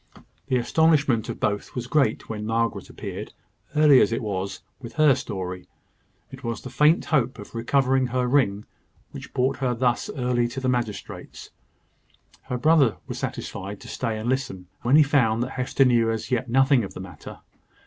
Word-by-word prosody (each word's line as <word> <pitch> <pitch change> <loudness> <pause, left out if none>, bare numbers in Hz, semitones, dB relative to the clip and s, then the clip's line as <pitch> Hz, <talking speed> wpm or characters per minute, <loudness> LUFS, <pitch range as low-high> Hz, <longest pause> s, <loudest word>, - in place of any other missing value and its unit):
The 130 - +2
astonishment 140 -2 +2
of - - -5
both 105 -1 -2
was 125 -1 -3
great 135 +2 +1
when 105 -1 -5
Margaret 115 0 -1
appeared, - - -7 0.4
early 150 -3 +7
as - - +3
it 115 - -2
was, 100 -2 -4 0.2
with 120 -4 -9
her 155 -2 +5
story. 90 -6 -5 0.6
It 135 +1 -11
was 115 -1 -3
the 130 - -8
faint 150 +3 +3
hope 130 -5 +1
of 105 - -11
recovering 130 +2 +1
her 125 +1 0
ring 120 -6 +1 0.5
which - - -9
brought 130 +1 0
her 130 -3 0
thus 120 0 0
early 125 -2 +1
to 120 +3 -6
the 130 - -2
magistrate's. 120 -4 -4 0.9
Her 125 - -3
brother 145 -3 +4
was - - -6
satisfied 100 +2 -5
to - - -11
stay 115 -4 -3
and 110 +2 -5
listen, 130 -8 -2 0.2
when 125 +4 +3
he 155 - +8
found 120 -5 +2
that 130 - -5
Hester 130 +1 +1
knew 120 -2 +3
as 115 +3 -3
yet 125 0 0
nothing 135 0 +4
of 100 - -7
the - - -7
matter. 95 -1 -10
125 Hz, 180 wpm, -24 LUFS, 115-135 Hz, 0.9 s, he